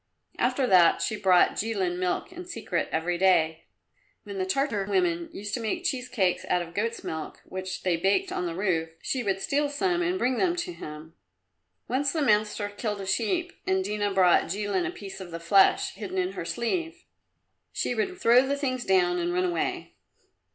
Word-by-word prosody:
After 255 Hz, +2 st, +2 dB
that 180 Hz, -6 st, +5 dB
she 215 Hz, -, -1 dB
brought 190 Hz, -4 st, +4 dB
Jilin 190 Hz, -5 st, -1 dB
milk 185 Hz, -, -1 dB
in 360 Hz, +1 st, -8 dB
secret 220 Hz, -, -3 dB
every 170 Hz, +2 st, -1 dB
day. 165 Hz, -4 st, +3 dB, 0.6 s
When 200 Hz, -2 st, -6 dB
the 185 Hz, -, -1 dB
Tartar 220 Hz, -2 st, 0 dB
women 175 Hz, -4 st, 0 dB
used 205 Hz, +1 st, -6 dB
to -, -, -1 dB
make 235 Hz, +11 st, -2 dB
cheese 250 Hz, -6 st, -2 dB
cakes 190 Hz, -8 st, +1 dB
out 180 Hz, -, +2 dB
of 170 Hz, 0 st, -12 dB
goat's 230 Hz, +5 st, -2 dB
milk, 160 Hz, -1 st, -5 dB
which 185 Hz, 0 st, -6 dB
they 180 Hz, -3 st, +1 dB
baked 195 Hz, -, +1 dB
on 180 Hz, -, -2 dB
the 165 Hz, -, -4 dB
roof, 170 Hz, -4 st, 0 dB
she 260 Hz, -, -1 dB
would 195 Hz, -4 st, -1 dB
steal 285 Hz, +7 st, 0 dB
some 350 Hz, +5 st, 0 dB
and 355 Hz, +1 st, 0 dB
bring 255 Hz, -6 st, 0 dB
them 350 Hz, -2 st, +2 dB
to 355 Hz, 0 st, -3 dB
him. 155 Hz, -, -9 dB, 0.7 s
Once 270 Hz, +2 st, +1 dB
the 315 Hz, -3 st, 0 dB
master 210 Hz, -3 st, +2 dB
killed 205 Hz, 0 st, -4 dB
a -, -, -5 dB
sheep, 290 Hz, -, 0 dB
and 190 Hz, 0 st, +2 dB
Dina 205 Hz, 0 st, -1 dB
brought 185 Hz, -2 st, +4 dB
Jilin 205 Hz, -, -1 dB
a -, -, -3 dB
piece 195 Hz, -, -9 dB
of 185 Hz, -, -8 dB
the 165 Hz, 0 st, -6 dB
flesh 190 Hz, +4 st, +4 dB
hidden 195 Hz, -2 st, -6 dB
in 185 Hz, 0 st, 0 dB
her 195 Hz, -, -6 dB
sleeve. 335 Hz, -, -2 dB, 0.7 s
She -, -, -1 dB
would 365 Hz, -, -2 dB
throw 245 Hz, +3 st, +5 dB
the 280 Hz, +1 st, 0 dB
things 255 Hz, -3 st, -2 dB
down 180 Hz, -2 st, +2 dB
and 175 Hz, 0 st, -1 dB
run 180 Hz, +1 st, +1 dB
away. 175 Hz, -2 st, -2 dB
205 Hz, 195 wpm, -27 LUFS, 180-255 Hz, 0.7 s, that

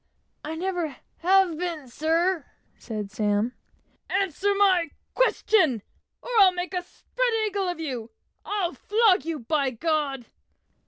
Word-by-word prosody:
"I 310 Hz, +2 st, -4 dB
never 345 Hz, -4 st, -2 dB, 0.2 s
have 365 Hz, -2 st, +3 dB
been, 335 Hz, -6 st, -3 dB
sir," 325 Hz, +6 st, 0 dB, 0.3 s
said 210 Hz, -3 st, -5 dB
Sam. 210 Hz, +2 st, 0 dB, 0.6 s
"Answer 390 Hz, +1 st, +1 dB
my 375 Hz, -5 st, +4 dB, 0.2 s
question, 365 Hz, -, +2 dB, 0.4 s
or -, -, -8 dB
I'll 385 Hz, -2 st, +8 dB
make 360 Hz, +1 st, -4 dB
a 360 Hz, -, 0 dB
spread -, -, -2 dB, 0.2 s
eagle 400 Hz, -2 st, -1 dB
of 350 Hz, -2 st, -3 dB
you! 250 Hz, -8 st, -4 dB, 0.3 s
I'll 390 Hz, -4 st, -1 dB
flog 420 Hz, -, +3 dB
you, 330 Hz, -1 st, -2 dB
by 275 Hz, +3 st, +1 dB
G 245 Hz, -, -11 dB, 0.4 s
d." -, -, -19 dB
345 Hz, 130 wpm, -26 LUFS, 280-385 Hz, 0.6 s, I'll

